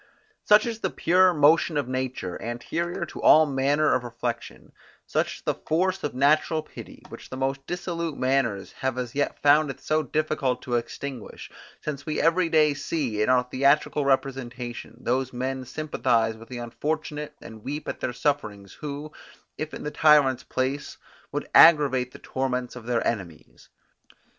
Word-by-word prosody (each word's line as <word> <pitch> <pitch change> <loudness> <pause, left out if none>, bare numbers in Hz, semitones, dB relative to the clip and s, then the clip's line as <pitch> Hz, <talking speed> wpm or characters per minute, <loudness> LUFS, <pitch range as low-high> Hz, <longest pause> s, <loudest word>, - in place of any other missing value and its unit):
Such 210 +1 +6
is 230 -2 -4
the - - -1
pure 185 +2 +4
motion 155 0 +4
of 140 -4 -1
nature, 130 -8 -4
anterior 170 +9 -3
to - - -9
all 155 0 +7
manner 145 +2 +2
of 130 - +1
reflection; 120 0 -5 0.3
such - - -1
is - - -13
the - - 0
force 185 +4 -1
of 145 - -3
natural 155 +3 +2
pity, - - -12
which - - -11
the 130 - -6
most 135 +1 -2
dissolute 170 -3 -3
manners 130 -7 0
have 130 -1 -1
as 125 -2 -4
yet 145 0 -1
found 145 +1 +5
it 135 - -6
so 155 0 0
difficult 155 -5 -1
to 125 - -5
extinguish, 120 +1 -5 0.3
since 145 -2 -5
we 155 - -2
every 165 +1 +3
day 155 -2 +4
see, 140 -6 -2
in 110 - +2
our 125 -1 +4
theatrical 140 +3 +2
representation, 125 -3 -2
those 130 +1 0
men 130 +1 -3
sympathize 120 -6 0
with 115 +1 -14
the 125 - -6
unfortunate 150 +4 -4
and 110 -1 -12
weep 145 +2 -5
at - - -4
their - - -2
sufferings, 105 -7 -2
who, 150 +1 -7 0.5
if 155 0 -3
in - - -7
the 150 - -3
tyrant's 150 -5 +4
place, 135 +2 -3 0.3
would - - -3
aggravate 140 -6 +6
the - - -11
torments 125 -2 -3
of 120 -2 -10
their 120 -1 0
enemies. 95 -8 -5
135 Hz, 165 wpm, -25 LUFS, 125-155 Hz, 0.5 s, all